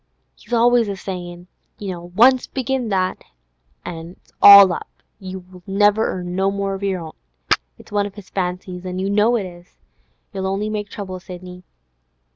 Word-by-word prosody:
He's - - -20
always 240 -1 +4
a 200 - -3
saying: 175 -2 -7 0.3
"Once 200 +7 +2
begin 260 -2 -2
that, 185 -2 0 0.7
an' 165 0 -7
it's - - -31
all 200 -2 +10
up; - - -6 0.3
you 185 -1 -9
never 205 +2 +3
earn 180 -1 -4
no 190 +1 +2
more 200 0 -2
of 195 - -6
your 190 -3 -1
own." 160 -1 -9 0.6
It's - - -17
one 205 -1 +1
of 200 - -13
his 205 -3 -13
fancies, 180 -1 -4
an' 185 0 -5
you 190 +1 -1
know 210 +4 +3
it 210 -5 -1
is. 175 +1 -13 0.6
You'll 190 -1 -3
only 200 +2 -2
make 210 -1 -4
trouble, 185 -3 -6
Sidney. 180 0 -10
190 Hz, 165 wpm, -20 LUFS, 180-205 Hz, 0.7 s, all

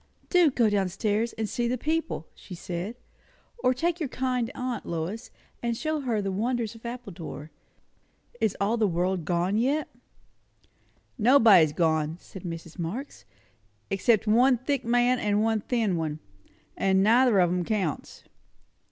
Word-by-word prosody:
"Do 355 -4 +5
go 245 -4 +2
down 200 -3 +1
stairs 210 +5 -1
and 220 -1 -3
see 240 +2 -1
the 250 +2 -1
people!" 315 - -2
she 185 - -11
said; 175 +6 -5 0.6
"or 255 - +3
take 335 +7 -1
your 305 -5 -2
kind 250 -2 -1
aunt, 250 -2 -3
Lois, 170 +9 -4 0.3
and 235 -1 -1
show 310 +2 -1
her 235 -7 -1
the 195 - -2
wonders 230 +2 -1
of 230 +1 -9
Appledore. 180 - -8 0.9
Is 215 - 0
all 210 +4 +1
the 220 -2 +2
world 180 -1 -1
gone 180 +5 0
yet?" 280 +5 +1 1.3
"Nobody's 215 - +6
gone," 160 -1 0
said 190 - -11
Mrs. 165 -1 -8
Marx; 215 - -5 0.7
"except 205 +3 +2
one 245 +4 +4
thick 265 +2 -2
man 245 +1 +2
and 210 0 +1
one 220 -1 +1
thin 225 -5 0
one; 155 -2 -2 0.6
and 190 0 +2
neither 235 +1 +5
of 175 -2 +4
'em 180 0 0
counts." 190 -6 -3
220 Hz, 150 wpm, -27 LUFS, 180-250 Hz, 1.3 s, Nobody's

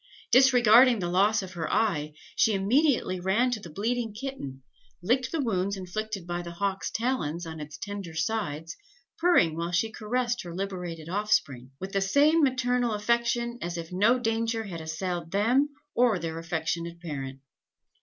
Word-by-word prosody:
Disregarding 250 -1 +7
the 180 -4 -2
loss 205 +3 +3
of 185 -1 -8
her 165 -3 -3
eye, 155 -9 +1 0.2
she 220 - +3
immediately 230 - +2
ran 205 +8 +2
to 235 - -1
the 175 - -10
bleeding 225 +5 -2
kitten, 210 - -6 0.4
licked 255 +7 +1
the 330 - -1
wounds 200 -3 -1
inflicted 195 +1 -5
by 175 0 -3
the 170 -1 -8
hawk's 195 +2 -2
talons 175 - -2
on 160 -1 -7
its 150 -1 -8
tender 200 -5 -6
sides, 165 -3 -2 0.4
purring 325 - +4
while 170 +1 -3
she 220 +6 +1
caressed 240 +2 -1
her 170 -1 -8
liberated 180 -4 -5
offspring, 170 - 0
with 190 +1 -6
the 195 - 0
same 290 +11 +4
maternal 250 -4 +1
affection 235 +2 0
as 175 0 -3
if 165 0 -6
no 210 +7 +4
danger 225 -1 -1
had 175 -6 -6
assailed 165 +1 -4
them 240 - +2 0.2
or 240 -4 +3
their 165 -1 -4
affectionate 165 +1 -3
parent." 135 -5 -6
195 Hz, 160 wpm, -27 LUFS, 170-235 Hz, 0.4 s, Disregarding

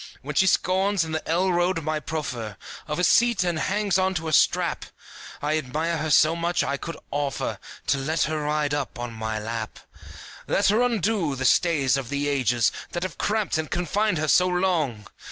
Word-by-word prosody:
When - - -5
she 190 - +3
scorns, 190 0 +2
in 160 - -6
the 155 0 -4
L 180 +3 +2
road, 175 -1 +1
my 155 0 -1
proffer 125 -10 -5 0.3
Of 150 - -3
a 180 - 0
seat 230 +2 +4
and 175 -3 -1
hangs 200 +2 +1
on 190 0 +1
to 165 -1 -3
a 155 - -2
strap; - - +2 0.6
I 155 +1 +1
admire 155 +5 -2
her 155 +1 -2
so 155 +2 +5
much, 170 +1 0
I 140 - -1
could 165 +3 -6
offer 145 -1 -2 0.3
To 140 - +1
let 155 +3 0
her 155 0 -1
ride 150 0 0
up 145 -5 -3
on 120 -1 -5
my 110 0 -3
lap. 110 0 -5 0.7
Let - - +2
her 215 +4 +3
undo 215 - +1
the 130 0 -3
stays 140 -5 +3
of 130 -4 -5
the 145 0 -1
ages, 125 -5 +2 0.2
That 175 - -2
have 185 -7 -5
cramped 210 -6 0
and 155 - -3
confined 180 +3 0
her 155 0 -1
so 180 +4 +4
long! 170 - 0
155 Hz, 195 wpm, -25 LUFS, 140-180 Hz, 0.7 s, so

